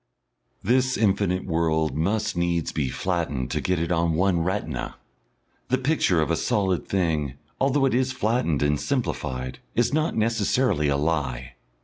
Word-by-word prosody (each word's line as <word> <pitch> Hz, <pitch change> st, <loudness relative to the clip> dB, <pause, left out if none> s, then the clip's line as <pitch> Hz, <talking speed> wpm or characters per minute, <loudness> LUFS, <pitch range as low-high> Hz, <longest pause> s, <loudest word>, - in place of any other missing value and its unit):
This 130 Hz, +4 st, +2 dB
infinite 95 Hz, -3 st, +1 dB
world 80 Hz, -2 st, 0 dB
must 105 Hz, +6 st, 0 dB
needs 85 Hz, -1 st, 0 dB
be 70 Hz, -4 st, -1 dB
flattened 80 Hz, -7 st, -2 dB
to -, -, -1 dB
get 90 Hz, -1 st, 0 dB
it 85 Hz, +1 st, -2 dB
on 85 Hz, -1 st, +2 dB
one 90 Hz, +1 st, +2 dB
retina. 80 Hz, -6 st, -2 dB, 0.7 s
The 130 Hz, -, +2 dB
picture 130 Hz, -, +2 dB
of 75 Hz, -, -2 dB
a -, -, +3 dB
solid 95 Hz, -4 st, 0 dB
thing, 80 Hz, -8 st, 0 dB, 0.2 s
although 135 Hz, +1 st, +2 dB
it 135 Hz, -, +1 dB
is 130 Hz, +1 st, +1 dB
flattened 110 Hz, -, 0 dB
and 75 Hz, 0 st, +1 dB
simplified, 65 Hz, -, -3 dB, 0.2 s
is 120 Hz, +3 st, +2 dB
not 155 Hz, +2 st, +1 dB
necessarily 110 Hz, -, +1 dB
a 70 Hz, -1 st, +2 dB
lie. 65 Hz, -6 st, -2 dB
90 Hz, 150 wpm, -25 LUFS, 80-115 Hz, 0.7 s, a